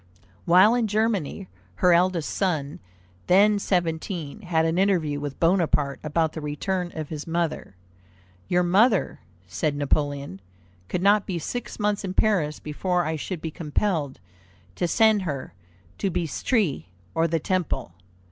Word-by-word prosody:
'" 95 +1 -31
While 185 +6 +7
in 240 -2 +1
Germany, 210 -4 -1 0.3
her 180 -1 +4
eldest 175 -2 +2
son, 155 -7 -1 0.5
then 205 +3 +5
seventeen, 170 -1 -2
had 165 -4 +1
an 165 +2 +1
interview 170 -7 +1
with 145 -1 -6
Bonaparte 165 -5 +1
about 160 +1 0
the 160 - -6
return 175 +5 -2
of 155 -2 -5
his 155 -1 -6
mother. 165 - -2 0.7
"Your 180 0 +2
mother," 200 +4 +3 0.3
said 145 - -2
Napoleon, 145 -7 -1 0.5
"could 180 - -2
not 205 +1 +4
be 185 - -2
six 245 +9 -5
months 210 -1 0
in 190 -1 -4
Paris 175 -9 +1
before 175 +4 -1
I 160 +1 -1
should 160 +2 -5
be 160 - -3
compelled 155 -2 -2 0.5
to 175 - -1
send 220 +3 +4
her 145 -7 -5 0.5
to 195 - 0
Bicêtre 175 - -1 0.3
or 165 +1 +2
the 165 0 0
Temple. 155 - -2
170 Hz, 145 wpm, -25 LUFS, 150-195 Hz, 0.7 s, While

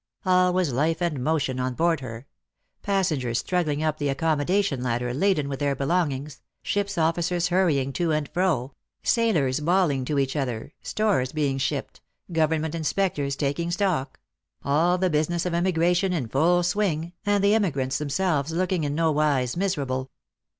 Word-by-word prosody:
All 180 0 +4
was 180 -7 0
life 155 +5 +1
and 160 -7 -1
motion 135 -4 0
on 130 0 -2
board 165 0 +2
her: 120 -1 -8 0.6
passengers 155 - 0
struggling 155 -4 -1
up 155 -1 -1
the 145 -1 0
accommodation 155 +2 0
ladder 125 0 -1
laden 155 -1 +1
with 135 -1 -4
their 140 -1 0
belong 155 +4 +1
ings, 135 +1 -7 0.2
ship's 205 -1 -1
officers 170 +2 +1
hurrying 155 -7 +1
to 170 +1 0
and 150 -1 0
fro, 155 -8 0 0.3
sailors 155 - +2
bawling 160 -4 +2
to 145 +2 -1
each 135 0 0
other, 130 -1 -3
stores 200 -13 0
being 140 -3 0
shipped, 140 0 -3 0.3
government 160 -1 +1
inspectors 160 -4 -1
taking 145 +4 -1
stock, 175 -6 -1 0.2
— - - -35
all 165 +6 +3
the 185 -1 +1
business 160 +3 0
of 180 - -1
emigration 175 +1 +2
in 145 -9 -2
full 170 +8 +2
swing, 175 -3 -1
and 205 -1 +1
the 200 +1 +4
emigrants 145 -12 0
themselves 150 0 0
looking 180 0 0
in 145 0 -1
nowise 150 -5 +1
miserable. 140 -9 -2
155 Hz, 155 wpm, -25 LUFS, 140-180 Hz, 0.6 s, All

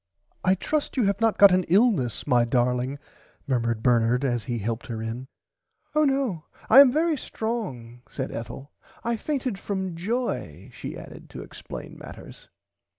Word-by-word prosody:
I 185 0 +4
trust 295 - -2
you 250 - +3
have 200 +1 +1
not 225 -1 +3
got 200 -1 +8
an 185 0 +3
illness 185 - +2
my 125 -4 +4
darling 125 +2 0 0.5
murmured 115 -4 0
Bernard 120 +2 +3
as 120 -4 -1
he 120 -2 -2
helped 115 +2 -3
her 115 -3 -4
in. 115 +3 -5 0.7
[Pg - - -32
94] 305 - +4
Oh - - +5
no 270 - 0 0.3
I 270 - +10
am 280 -3 +9
very 320 +3 +2
strong 145 - -5
said 130 -1 -4
Ethel 135 +5 -7 0.3
I 235 0 0
fainted 255 -4 -2
from 190 -3 -3
joy 230 +9 -3
she - - -7
added - - -11
to - - -8
explain - - -9
matters. - - -12
165 Hz, 165 wpm, -25 LUFS, -, 0.7 s, I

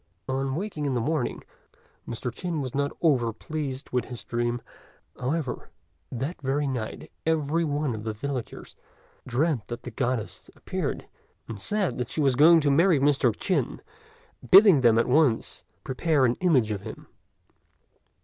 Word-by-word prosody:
On 135 0 -1
waking 160 -5 -3
in 135 - -1
the - - +1
morning, 140 +1 -2 0.6
Mr. 120 0 -4
Chin 175 +2 -3
was 130 -3 -4
not 140 0 0
over 125 -8 +3
pleased 140 +2 -5
with 125 -1 0
his 125 -2 -8
dream; 120 0 -1 0.6
however 135 +1 -3 0.4
that 135 +8 -4
very 140 +2 0
night 120 -5 -5
every 160 +1 +1
one 145 -3 -1
of 110 -1 -6
the 110 - -2
villagers 125 +2 -6 0.5
dreamt 130 -2 0
that 120 0 -6
the 125 - -7
Goddess 125 -1 -3
appeared - - -4 0.4
and 110 -4 -7
said 180 - -1
she - - -4
was 140 -3 +3
going 160 +4 +7
to 145 -1 +2
marry 165 +2 +4
Mr. 140 -3 +3
Chin, 185 - -1 0.7
bidding 195 -6 +8
them 115 -2 +5
at 115 - +3
once 130 -3 +2 0.2
prepare 140 +1 +1
an 120 - +3
image 135 -12 +3
of 100 -2 -3
him. - - -9
135 Hz, 150 wpm, -26 LUFS, 120-155 Hz, 0.7 s, bidding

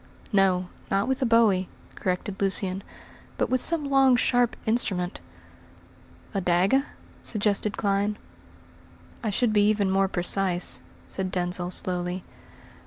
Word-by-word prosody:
"No, 185 -2 +3 0.2
not 195 +4 +1
with 265 +1 -1
a 255 - +2
bowie," 215 -5 +3 0.2
corrected 190 +2 -3
Lucian, 195 -1 +1 0.6
"but - - -1
with 255 -1 +3
some 330 -3 +3
long, 270 -2 +5
sharp 245 -1 +2
instrument." 195 -5 0 1.1
"A 195 - -1
dagger?" 190 +11 +2 0.4
suggested 210 -1 0
Clyne. 200 +1 0 1.1
"I 225 - -2
should 220 +2 +1
be 205 0 +4
even 205 -3 +1
more 195 0 +2
precise," 180 0 -1 0.3
said 190 -1 -3
Denzil 180 0 -1
slowly. 180 0 -1
195 Hz, 120 wpm, -26 LUFS, 185-230 Hz, 1.1 s, long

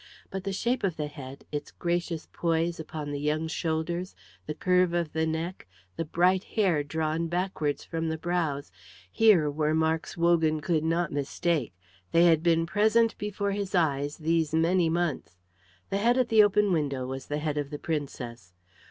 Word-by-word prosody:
But 190 0 -5
the 195 - -1
shape 235 +6 -1
of 185 -4 0
the 150 - -1
head, 140 -2 -9
its 145 -1 -4
gracious 170 -2 -2
poise 165 0 0
upon 155 -2 -5
the 145 - -3
young 150 +2 0
shoulders, 165 +3 -2 0.3
the 150 - -3
curve 180 0 +2
of 170 -3 -1
the 160 0 +1
neck, 160 - -4 0.3
the 165 - -2
bright 180 +4 +2
hair 185 -8 +1
drawn 160 +2 -1
backwards 165 -4 -1
from 165 0 -3
the 160 - -2
brows, 160 - -2 0.4
here 200 - +5
were 155 +1 0
marks 160 +1 0
Wogan 165 -2 +3
could 155 0 0
not 165 +1 0
mistake. 145 - -1 0.4
They 170 - +6
had 165 -2 +5
been 165 -1 +3
present 220 +5 +3
before 205 -1 -2
his 200 -1 -3
eyes 145 -4 +1
these 160 -1 +1
many 165 +1 +3
months. 160 - -2 0.5
The 195 - +1
head 240 +4 +3
at 255 -2 +2
the 220 -1 +7
open 205 -1 +3
window 140 -5 -1
was 130 +1 -6
the 145 - -2
head 150 -1 -1
of 145 -1 -3
the 145 - -5
Princess. 125 - -5
165 Hz, 175 wpm, -28 LUFS, 150-180 Hz, 0.5 s, the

